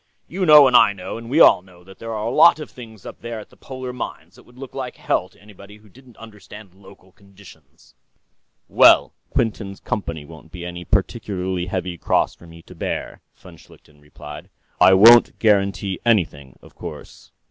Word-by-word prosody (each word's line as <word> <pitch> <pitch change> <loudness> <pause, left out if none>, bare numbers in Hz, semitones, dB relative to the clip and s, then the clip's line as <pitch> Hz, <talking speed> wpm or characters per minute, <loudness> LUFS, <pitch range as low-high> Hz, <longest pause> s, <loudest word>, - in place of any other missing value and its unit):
You 185 +1 -3
know 150 -2 +8
and 125 -2 +2
I 100 - +6
know 95 +3 -8
and 115 0 -11
we 145 +5 +1
all 90 - +6
know 90 -1 -20
that 95 +1 -17
there 115 0 -7
are 110 -1 -4
a 115 - -2
lot 170 +4 +5
of 150 - -9
things 110 -5 -14
up - - -11
there 115 -1 -7
at 105 - -14
the - - -20
polar 130 -1 -9
mines 125 - -8
that - - -19
would 120 +1 -21
look 135 0 -10
like 130 -2 -6
hell 90 - -2
to - - -26
anybody 105 0 -16
who 105 0 -22
didn't 125 +2 -20
understand 105 -3 -14
local 95 -1 -19
conditions...." 95 -8 -20 0.7
"Well, - - +5 0.2
Miss - - -34
Quinton's 105 -4 -2
company 85 -7 -5
won't 80 +1 -15
be 90 -1 -9
any 90 0 -8
particularly 95 -3 -3
heavy 90 -2 -5
cross - - 0
for 85 - -18
me 85 0 -15
to 90 - -15
bear," 85 - -6
von - - -16
Schlichten 75 -1 -21
replied. 75 0 -12 0.3
"I 95 - +6
won't 115 +5 +6
guarantee 100 -3 0
anything, 80 - -1
of - - -17
course...." - - -11
100 Hz, 195 wpm, -20 LUFS, 90-115 Hz, 0.7 s, know